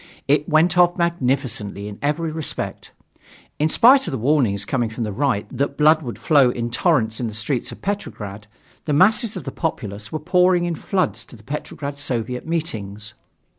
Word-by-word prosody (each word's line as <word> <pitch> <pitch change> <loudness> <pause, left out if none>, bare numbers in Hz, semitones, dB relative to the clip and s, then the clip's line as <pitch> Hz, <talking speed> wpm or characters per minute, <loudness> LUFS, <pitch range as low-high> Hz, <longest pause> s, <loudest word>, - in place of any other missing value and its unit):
It 145 +3 +2
went 165 +3 +3
off 175 0 +4
magnificently 130 - -1
in 105 -1 -9
every 155 +3 -1
respect. 160 -1 -4 0.7
In 155 +2 +2
spite 265 - +6
of - - -2
the 135 - -2
warnings 115 -6 +1
coming 120 -2 -1
from 115 +2 -4
the 105 - -3
Right 110 -1 0
that 140 0 -1
blood 155 +1 +5
would 120 -6 -6
flow 140 -6 +4
in 120 -1 -3
torrents 110 -2 +1
in 120 - -1
the 110 - -6
streets 120 +3 -2
of - - -12
Petrograd, 105 - -5 0.4
the 150 - 0
masses 210 - +3
of - - -6
the - - -5
populace 105 - -4
were 155 - -2
pouring 180 +2 +3
in 175 - -1
floods 185 0 -1
to - - -13
the 110 - -17
Petrograd 140 +1 -6
Soviet 125 -1 -3
meetings. 110 -10 -4
140 Hz, 180 wpm, -21 LUFS, 115-165 Hz, 0.7 s, spite